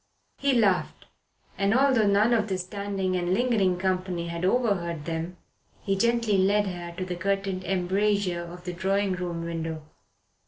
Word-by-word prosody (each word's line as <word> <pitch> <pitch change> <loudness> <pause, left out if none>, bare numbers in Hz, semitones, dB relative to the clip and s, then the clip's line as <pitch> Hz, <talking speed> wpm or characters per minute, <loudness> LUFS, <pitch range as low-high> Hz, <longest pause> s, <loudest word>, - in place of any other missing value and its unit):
He 280 -1 +2
laughed, 200 -7 +1 0.5
and 200 +2 +2
although 260 -5 +4
none 205 +4 +4
of 220 -2 +2
the 190 -2 -1
standing 195 0 -3
and 180 +1 +1
lingering 215 -7 +2
company 185 -2 -1
had 170 +1 -4
overheard 185 -7 0
them, 165 +2 -4 0.4
he 195 - -1
gently 230 -1 +2
led 205 +2 +3
her 175 -2 -5
to 185 - -2
the 180 -1 -4
curtained 195 +1 -1
embrasure 190 0 +1
of 175 +1 -9
the 180 -1 -4
drawing 195 +2 0
room 175 -2 -4
window. 165 -2 -4
190 Hz, 155 wpm, -26 LUFS, 175-205 Hz, 0.5 s, although